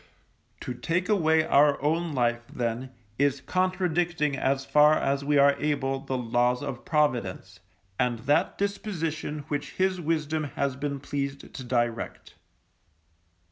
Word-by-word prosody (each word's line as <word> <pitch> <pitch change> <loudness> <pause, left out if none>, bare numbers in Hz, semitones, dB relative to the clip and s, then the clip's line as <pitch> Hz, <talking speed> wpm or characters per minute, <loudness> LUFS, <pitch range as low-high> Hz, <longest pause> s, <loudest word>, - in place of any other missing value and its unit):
To 125 - -4
take 170 +8 -2
away 160 -6 +3
our 145 0 +4
own 160 +3 0
life, 120 -2 +1
then, 120 +1 -3 0.3
is 140 -1 +2
contradicting 175 -4 0
as 135 0 0
far 150 +2 +5
as 140 +1 0
we 145 +1 +2
are 140 0 +6
able 135 -3 0
the 135 -1 -3
Laws 125 +1 +1
of 130 -4 -5
Providence, 130 - -1 0.4
and 125 -1 +1
that 145 - +2
disposition 165 -7 -3
which 145 -1 -3
His 185 -1 0
wisdom 155 -1 -1
has 140 -2 0
been 140 0 -3
pleased 140 -1 -4
to 130 - -7
direct. 120 -2 -2
145 Hz, 135 wpm, -27 LUFS, 130-160 Hz, 0.4 s, are